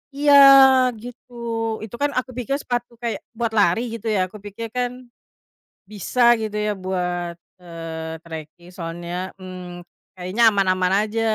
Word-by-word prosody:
Iya 290 0 +3 0.7
gitu, 245 +2 -12 0.5
itu 220 +1 -8
kan 290 0 +1
aku 255 0 -7
pikir 250 +2 -2
sepatu 240 -2 -4
kayak 235 -2 -4
buat 230 -1 -3
lari 205 +1 +3
gitu 225 0 -3
ya - - +1
aku 210 - -12
pikir 215 +3 -6
kan, 245 -1 0 1.0
bisa 215 +4 -3 0.2
gitu 215 -1 -3 0.2
ya - - +1
buat, 180 -2 -2 0.3
eee, 165 -1 -7
treking 160 +1 -10
soalnya, 175 +1 -5
mmm, 180 -1 -9 0.4
kayaknya 185 +6 -1
aman-aman 185 -2 +1 0.2
aja 225 +1 -2
195 Hz, 135 wpm, -22 LUFS, 175-235 Hz, 1.0 s, Iya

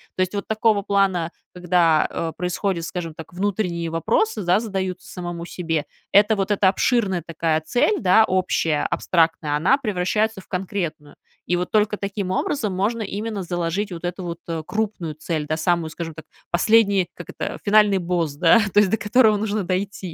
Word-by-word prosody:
То - - -1
есть 185 +1 0
вот 200 -1 -4
такого 220 -1 +2
плана, 195 -4 +1 0.2
когда, 175 -3 +3
э, 165 - -3
происходят, 180 -1 -2
скажем 165 -2 -5
так, 160 +2 -11
внутренние 180 -3 -2
вопросы, 220 - 0
да, 180 +1 +3
задаются 190 -5 -4
самому 175 -2 -6
себе, 165 -4 -2 0.3
это 210 +2 +5
вот 195 -1 -1
эта 200 -2 +4
обширная 200 -3 +1
такая 165 -1 -1
цель, 245 - +1
да, 195 +2 +5
общая, 165 -5 0
абстрактная, 165 -3 +1
она 215 - +3
превращается 210 -2 -1
в - - -23
конкретную. 180 -6 -4 0.3
И 175 - +1
вот 180 0 -2
только 210 -1 +2
таким 200 -2 -3
образом 210 +2 -1
можно 220 +4 0
именно 205 0 -4
заложить 175 +3 -2
вот 170 -1 -7
эту 180 +1 -4
вот, 170 -1 -5
э, 165 -2 -3
крупную 210 -7 -3
цель, 155 0 -3
да, 155 - -1
самую, 165 0 0
скажем 165 -1 -6
так, 160 - -10 0.2
последний, 200 0 +3
как 175 - -10
это, - - -5
финальный 205 -2 +4
босс, 170 -4 -1
да, 165 +8 +5
то 205 - +6
есть 210 -2 +4
до 220 - +1
которого 215 0 +4
нужно 210 0 -1
дойти. 185 +3 -2
185 Hz, 175 wpm, -22 LUFS, 170-205 Hz, 0.3 s, то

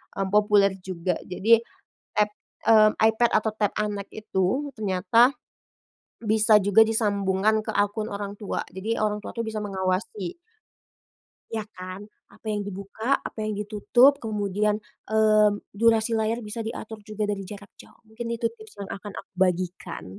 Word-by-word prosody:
mmm, 195 -1 -1
populer 205 -2 +4
juga, 180 -2 -2
jadi 220 +5 +4 0.6
tab 210 - +4 0.4
mmm, 215 -1 +7
iPad 220 +1 +3
atau 215 0 0
Tab 210 -2 +1
anak 205 -1 -2
itu, 215 +6 -1
ternyata 215 +5 +3 0.9
bisa 215 0 +5
juga 205 +2 +4
disambungkan 210 -1 +1
ke - - -13
akun 205 +2 0
orang 200 0 -4
tua, 205 - -2
jadi 215 +5 -2
orang 210 0 0
tua - - -6
tuh 230 - -1
bisa 220 -1 -3
mengawasi. 190 - -2 1.2
Iya 220 -2 -2
kan, 185 +1 -8 0.3
apa - - -22
yang 205 - -1
dibuka, 200 +2 -8 0.2
apa - - -11
yang 215 0 -2
ditutup, 215 +6 +4
kemudian, 210 -1 0 0.3
mmm, 215 -1 +4 0.2
durasi 230 0 +4
layar 225 +1 0
bisa 225 +2 -4
diatur 220 -1 -6
juga 215 0 -2
dari 205 -1 -2
jarak 205 -1 -10
jauh, - - -20
mungkin 225 +2 -7
itu 230 - -3
tips 220 -2 -14
yang 200 -1 -7
akan 205 0 -9
aku - - -10
bagikan. 180 - -1
210 Hz, 150 wpm, -25 LUFS, 200-220 Hz, 1.2 s, mmm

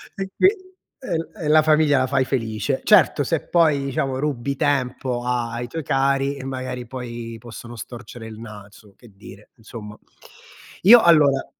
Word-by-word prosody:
e 195 -1 -5
qui - - +6 0.5
e 195 -10 -4
l 165 - -5
e - - -2
la 155 0 +6
famiglia 155 -3 +3
la 130 - +1
fai 135 0 +1
felice. 115 0 -2
Certo, 185 -8 +4
se, 165 +3 -2
poi, 155 -5 +3
diciamo, 135 0 -2
rubi 140 -2 -2
tempo 130 -4 -1
a 120 -1 -1
ai 120 +1 -5
tuoi 160 +6 -6
cari 135 +1 0
e, 135 - -8
magari, 130 -2 -5
poi, 120 -2 -7
possono 120 +1 -10
storcere 115 0 -9
il 110 -1 -10
naso, 105 -2 -13
che 120 - -18
dire, 100 +1 -14
insomma. 110 -2 -10 0.9
Io, 230 +5 +9
allora 150 -6 +4
130 Hz, 165 wpm, -22 LUFS, 115-145 Hz, 0.9 s, Io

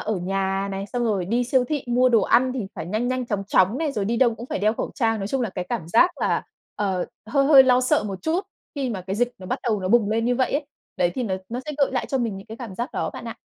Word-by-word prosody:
ở 215 -1 -2
nhà 195 +2 -1
này, 195 0 -4
xong 245 -1 0
rồi 205 -5 0
đi 235 +7 0
siêu 250 +1 +2
thị 295 -3 -2
mua 250 +1 +3
đồ 230 -3 +4
ăn 255 +5 +3
thì 245 -6 -3
phải - - -6
nhanh 215 +7 -1
nhanh 255 -1 -1
chóng 200 -3 -2
chóng 195 +4 +3
này, 310 -3 -1
rồi 205 -5 -1
đi 230 +3 0
đâu 235 -2 +3
cũng 235 +2 -9
phải - - -3
đeo 210 +2 +2
khẩu - - -4
trang. 225 -4 +1
Nói 195 0 -3
chung 270 +2 -1
là 230 - -1
cái 180 -1 -5
cảm 215 -9 -3
giác 235 - +5
là, - - +1 0.3
ờ, 190 -3 -1 0.2
hơi 275 +4 +2
hơi 275 -2 +9
lo 255 -1 +4
sợ 255 -2 +2
một 195 -2 -5
chút, 330 +4 +1 0.3
khi 275 -3 -2
mà 195 - -4
cái 195 - -2
dịch 245 +2 +1
nó 185 - -10
bắt - - -2
đầu 220 -5 0
nó 185 - -2
bùng 215 -1 +3
lên 225 +1 +1
như 245 +1 +2
vậy 260 - +1
ấy. 285 +1 -1 0.3
Đấy, 175 - +2
thì 255 - -2
nó 195 -5 -1
nó 240 +2 -4
sẽ 300 - -3
gợi 275 -2 +2
lại 255 - -1
cho 270 - -1
mình 230 -5 -1
những 195 - -10
cái 225 - -8
cảm 230 -6 -8
giác 240 +7 -4
đó - - -2
bạn - - -9
ạ. - - -5
230 Hz, 305 wpm, -23 LUFS, 195-255 Hz, 0.3 s, hơi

